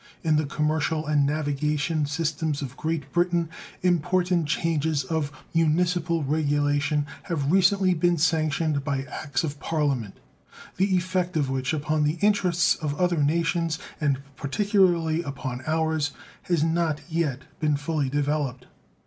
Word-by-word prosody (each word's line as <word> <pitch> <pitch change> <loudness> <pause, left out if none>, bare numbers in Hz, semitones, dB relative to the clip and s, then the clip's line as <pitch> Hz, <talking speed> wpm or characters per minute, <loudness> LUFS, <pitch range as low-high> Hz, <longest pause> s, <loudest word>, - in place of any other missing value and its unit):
In 160 -2 +3
the 150 -1 +1
commercial 155 +1 0
and 145 -2 +2
navigation 150 +1 0
system 155 0 -1
of 135 0 -6
Great 155 -3 -3
Britain 175 -1 +1 0.3
important 175 -1 +2
changes 160 -2 0
of 145 +1 -2 0.2
municipal 165 0 +2
regulation 145 0 +1 0.2
have 155 -6 -1
recently 190 0 +4
been 175 +1 +2
sanctioned 155 -2 +1
by 135 -1 -1
acts 145 +4 -3
of 145 -2 -4
Parliament, 140 -10 -1 0.6
the 190 +1 +2
effect 180 -1 0
of 140 -3 0
which 130 +1 -1
upon 155 0 0
the 150 +3 +1
interests 185 -4 +3
of 145 -2 -4
other 175 -3 +2
nations, 165 +2 +1 0.2
and 140 -3 +2 0.2
particularly 170 0 +2
upon 135 -4 -5
ours, 160 -2 0 0.4
has 170 -4 +2
not 165 -2 +1
yet 160 -6 -1 0.2
been 150 -2 +1
fully 145 -2 -1
developed. 145 -3 -1
155 Hz, 130 wpm, -25 LUFS, 145-170 Hz, 0.6 s, recently